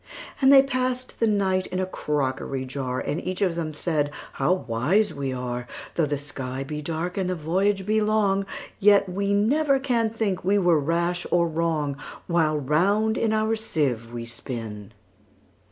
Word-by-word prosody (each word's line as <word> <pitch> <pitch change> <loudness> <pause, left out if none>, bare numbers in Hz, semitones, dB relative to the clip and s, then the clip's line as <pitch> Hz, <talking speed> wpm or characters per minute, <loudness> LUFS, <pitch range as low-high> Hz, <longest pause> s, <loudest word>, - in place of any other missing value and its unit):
And 265 0 +6
they 270 -1 +9
pass'd 255 -1 -2
the 230 - +3
night 190 -3 +1
in 185 - -3
a 185 - +1
crockery 135 -5 -2
jar; 130 -1 -3
And 145 - -2
each 185 0 -3
of 185 -3 +2
them 165 -2 -3
said, 150 -3 0 0.2
"How - - +1
wise 180 - +1
we 140 -1 -3
are! 125 -1 -4 0.3
Though 160 -3 +1
the 145 0 -1
sky 135 -2 -5
be 150 +2 -5
dark, 165 +4 -3
and 185 -1 -1
the 185 - 0
voyage 190 +5 0
be 215 +1 +2
long, 205 -2 +2 0.3
Yet 200 0 +5
we 200 +2 -1
never 270 +8 +3
can 240 -4 +1
think 215 -4 -2
we 195 +3 +3
were 175 -5 +4
rash 170 +4 0
or 170 -1 +3
wrong, 155 -3 -1 0.3
While 160 -3 +2
round 195 +10 +2
in 225 -2 +1
our 220 +1 +1
sieve 135 - -1
we 120 -1 -5
spin." 115 -3 -7
175 Hz, 170 wpm, -25 LUFS, 145-205 Hz, 0.3 s, they